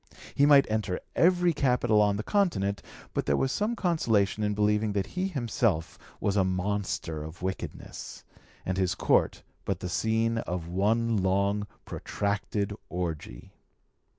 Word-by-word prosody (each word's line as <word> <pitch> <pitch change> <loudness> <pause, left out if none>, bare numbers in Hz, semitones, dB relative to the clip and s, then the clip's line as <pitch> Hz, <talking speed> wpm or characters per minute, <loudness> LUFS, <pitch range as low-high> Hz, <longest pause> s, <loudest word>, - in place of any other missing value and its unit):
He 140 - +4
might 140 -2 +7
enter 110 -4 -1 0.2
every 175 0 +4
capital 125 -6 +3
on 105 -1 +3
the 105 - -3
Continent, 100 - +1 0.3
but - - -2
there 70 -1 +3
was 135 - +1
some 215 - 0
consolation 115 - +1
in 105 -1 0
believing 105 0 +2
that 100 -2 0
he 185 - -2
himself 115 - -1 0.2
was 100 - 0
a 100 - +4
monster 95 -4 -2
of 80 +3 -9
wickedness, 95 0 -6 0.4
and 95 +1 -1
his 95 -2 +1
Court - - +2 0.2
but 95 -3 -2
the 90 - -4
scene 115 +3 +1
of 90 -5 -4
one 110 +5 +1
long 100 +2 +1 0.2
protracted 100 0 -2 0.2
orgie. 80 -8 -5
105 Hz, 145 wpm, -28 LUFS, 95-115 Hz, 0.4 s, might